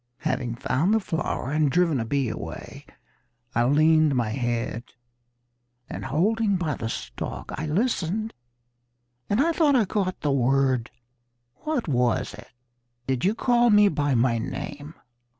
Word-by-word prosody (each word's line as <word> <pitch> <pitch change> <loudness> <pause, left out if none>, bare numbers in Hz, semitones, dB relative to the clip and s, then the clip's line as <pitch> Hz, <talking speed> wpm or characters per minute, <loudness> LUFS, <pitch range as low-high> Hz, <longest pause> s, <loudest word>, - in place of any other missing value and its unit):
"Having 125 -3 -2
found 145 - +1
the - - +3
flower 160 - -3
and 150 -1 +2
driven 165 -5 +2
a 115 - -2
bee 135 +2 0
away, - - -7 0.7
I 120 +1 +2
leaned 155 +1 +4
my 120 -3 0
head, 120 -1 -2 1.0
And - - -6
holding 200 +9 +1
by 170 -5 -1
the 115 -3 -4
stalk, - - -6
I 155 +2 -4
listened 215 +3 -1 1.0
and 205 - +1
I 325 +5 +3
thought 305 -3 +3
I 235 -4 +4
caught 190 -1 -2
the 145 - 0
word 130 -2 +2 0.7
What 300 - -2
was 125 -2 +1
it? - - -12 0.6
Did 130 -1 -1
you 205 +3 +2
call 240 0 +3
me 210 -1 +6
by 145 -4 0
my 115 0 +2
name? 145 +6 -6
150 Hz, 145 wpm, -25 LUFS, 125-205 Hz, 1.0 s, me